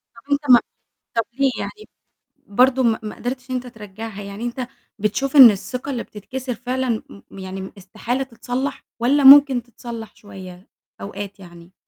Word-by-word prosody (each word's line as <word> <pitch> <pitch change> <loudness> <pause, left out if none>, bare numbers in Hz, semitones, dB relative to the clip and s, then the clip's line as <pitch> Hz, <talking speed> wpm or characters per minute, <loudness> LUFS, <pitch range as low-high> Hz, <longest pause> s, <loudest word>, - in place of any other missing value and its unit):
طَب 275 +5 -16
أنت 285 -1 0
ما 240 - +9 0.6
طَب 230 - +2 0.2
ليه 275 -1 +3
يعني 430 -2 -7 0.6
برضه 255 +5 +3
ما 225 -2 +2
ما 210 - -6
قدرتش 250 +1 -5
إن 255 - -2
أنت 250 0 -4
ترجّعها، 215 -1 -9
يعني 200 +3 -8
أنت 245 +1 -4 0.3
بتشوف 265 +7 -1
إن 255 -5 +11
الثقة 250 +7 -6
اللي 245 -3 -3
بتتكسر 250 +4 -6
فعلًا 250 -1 -2 0.3
م 195 - -11
يعني 190 0 -7
استحالة 220 +7 -4
تتصلّح 260 +2 -5 0.2
والّا 275 +5 +2
ممكن 270 -3 +8
تتصلّح 235 -2 -9
شوية 185 -2 -12 0.3
أوقات 200 0 -7
يعني؟ 175 -1 -15
240 Hz, 155 wpm, -21 LUFS, 205-260 Hz, 0.6 s, إن